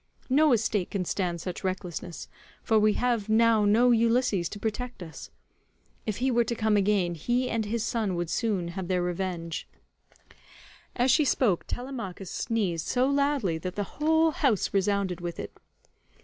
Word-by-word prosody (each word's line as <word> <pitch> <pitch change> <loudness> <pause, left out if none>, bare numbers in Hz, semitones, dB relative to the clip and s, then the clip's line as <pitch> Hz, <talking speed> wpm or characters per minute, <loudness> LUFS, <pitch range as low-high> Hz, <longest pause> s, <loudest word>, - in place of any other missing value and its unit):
No 300 +2 +5
estate 215 -5 +1
can 195 -3 -2
stand 175 -2 -2
such 180 +2 -6
recklessness, 185 -3 -4 0.4
for 220 -1 +3
we 215 0 +4
have 235 -4 0
now 220 -1 +4
no 235 +4 +5
Ulysses 230 -6 +2
to - - -7
protect 225 0 -4
us. 160 -4 -10 0.8
If 215 - -1
he 260 +2 +1
were 240 0 +3
to 235 +1 -3
come 220 -1 +1
again, 195 -3 +2
he 240 - 0
and 225 -1 0
his 220 +1 -2
son 215 -6 -1
would 170 -1 -3
soon 200 -7 -1
have 185 +1 -5
their 180 -1 +1
revenge." 175 -2 -3 1.3
As 245 +1 +3
she 305 - +4
spoke 235 - +1
Telemachus 230 -8 -6
sneezed 190 -8 -1
so 250 0 +2
loudly 280 - +1
that 180 +2 -5
the 205 +6 -5
whole 320 +1 +4
house 265 - +1
resounded 195 -2 0
with 175 -1 -5
it. - - -7
210 Hz, 165 wpm, -27 LUFS, 180-240 Hz, 1.3 s, No